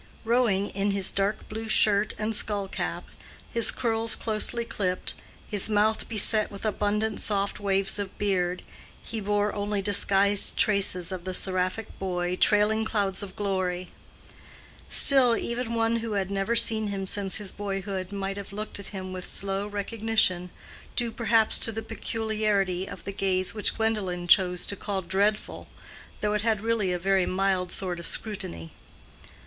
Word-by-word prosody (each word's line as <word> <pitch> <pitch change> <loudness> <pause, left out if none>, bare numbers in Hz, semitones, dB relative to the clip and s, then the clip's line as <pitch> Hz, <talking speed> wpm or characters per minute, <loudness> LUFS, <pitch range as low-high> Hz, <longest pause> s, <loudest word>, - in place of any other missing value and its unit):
Rowing 225 -4 +1
in 200 +1 -1
his 195 -1 +2
dark 200 +2 -2
blue 220 +1 -6
shirt 210 -1 +3
and 220 +1 -1
skull 205 -2 0
cap, - - -5 0.5
his 230 -2 +2
curls 225 -1 0
closely 230 +2 0
clipped, 185 -5 -2 0.3
his 205 0 0
mouth 215 +1 +1
beset 215 -1 +3
with 200 +2 -9
abundant 210 0 -1
soft 200 -1 -1
waves 195 0 +1
of 200 -2 -6
beard, 180 -3 -1 0.4
he 225 - -5
bore 205 0 -1
only 205 0 -2
disguised 200 0 +5
traces 195 -4 +2
of 185 -2 -6
the 185 0 -3
seraphic 185 +4 -2
boy 180 -1 -2
"trailing 210 +3 +2
clouds 200 -4 -1
of 200 -2 -8
glory." 185 -3 -3 1.0
Still, 255 -4 +8
even 235 0 -4
one 230 0 +1
who 230 -1 -4
had 195 -1 -2
never 200 +4 -1
seen 220 -2 +4
him 195 -1 -4
since 195 0 -1
his 205 -3 -4
boyhood 195 -2 -5
might 195 0 -4
have 200 -1 -8
looked 210 +1 -6
at 200 - -6
him 185 -2 -7
with 185 -1 -6
slow 195 +2 -2
recognition, 205 -3 -1 0.5
due 235 -1 +1
perhaps 225 -1 +1
to 225 - +4
the 225 0 -5
peculiarity 210 -5 -2
of - - -10
the 195 - -5
gaze 185 -1 -1
which 210 -3 -1
Gwendolen 200 -6 -2
chose 180 -1 +3
to 200 - -2
call 195 -1 -4
"dreadful," 200 +4 -1 0.5
though 210 0 0
it 210 - 0
had 220 -1 0
really 225 -4 0
a 180 - -1
very 190 +1 +1
mild 185 -1 -1
sort 180 -3 -2
of 170 - -6
scrutiny. 85 - -4
200 Hz, 160 wpm, -26 LUFS, 190-220 Hz, 1.0 s, Still